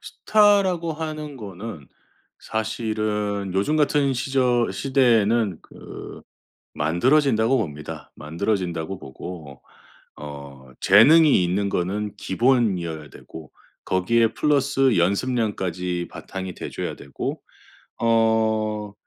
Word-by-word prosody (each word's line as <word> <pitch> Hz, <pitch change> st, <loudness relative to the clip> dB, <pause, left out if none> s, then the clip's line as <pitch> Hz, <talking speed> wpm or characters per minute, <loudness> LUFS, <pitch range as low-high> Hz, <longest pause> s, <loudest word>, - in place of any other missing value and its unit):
스타라고 195 Hz, -6 st, +2 dB
하는 155 Hz, -2 st, -6 dB
거는 100 Hz, -, -8 dB, 0.5 s
사실은 105 Hz, -3 st, -2 dB
요즘 100 Hz, +11 st, +1 dB
같은 145 Hz, -2 st, +2 dB
시절 125 Hz, -2 st, +1 dB
시대에는 115 Hz, -, +2 dB
그 -, -, -11 dB, 0.5 s
만들어진다고 115 Hz, -, +2 dB
봅니다. 75 Hz, -8 st, -6 dB
만들어진다고 90 Hz, +1 st, -3 dB
보고. 75 Hz, -1 st, -10 dB, 0.6 s
어. 70 Hz, -3 st, -10 dB
재능이 135 Hz, -, +6 dB
있는 100 Hz, +3 st, 0 dB
거는 100 Hz, +4 st, -2 dB
기본이어야 95 Hz, -, 0 dB
되고 80 Hz, -1 st, -12 dB, 0.3 s
거기에 115 Hz, +5 st, +1 dB
플러스 140 Hz, -, +2 dB
연습량까지 90 Hz, -4 st, -1 dB
바탕이 95 Hz, -2 st, -7 dB
돼 -, -, -7 dB
줘야 -, -, -5 dB
되고. 70 Hz, -1 st, -6 dB, 0.6 s
어 110 Hz, -2 st, +1 dB
105 Hz, 235 characters per minute, -23 LUFS, 90-130 Hz, 0.6 s, 재능이